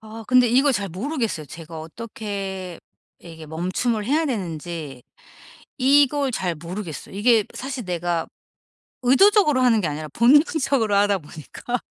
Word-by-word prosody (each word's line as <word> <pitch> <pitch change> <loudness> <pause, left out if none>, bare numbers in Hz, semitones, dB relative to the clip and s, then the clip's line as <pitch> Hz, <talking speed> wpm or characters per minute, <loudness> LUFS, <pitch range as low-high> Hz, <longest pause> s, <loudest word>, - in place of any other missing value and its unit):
아 220 +1 -10
근데 250 -1 +5
이걸 270 +4 +4
잘 200 -4 -2
모르겠어요. 220 - -3
제가 165 +2 -9
어떻게 195 -1 -6 0.4
이게 160 -2 -12
멈춤을 185 +8 -2
해야 305 +7 +1
되는지 165 - -5 0.8
이걸 280 +1 +3
잘 185 -7 -2
모르겠어요. 170 +2 -7
이게 220 +1 +4
사실 260 -2 -5
내가 175 -2 -2 0.8
의도적으로 300 - +4
하는 230 -4 +4
게 170 - -1
아니라 155 +1 -5
본능적으로 265 -3 +3
하다 200 0 +3
보니까. 160 +10 -6
210 Hz, 305 characters per minute, -22 LUFS, 170-255 Hz, 0.8 s, 근데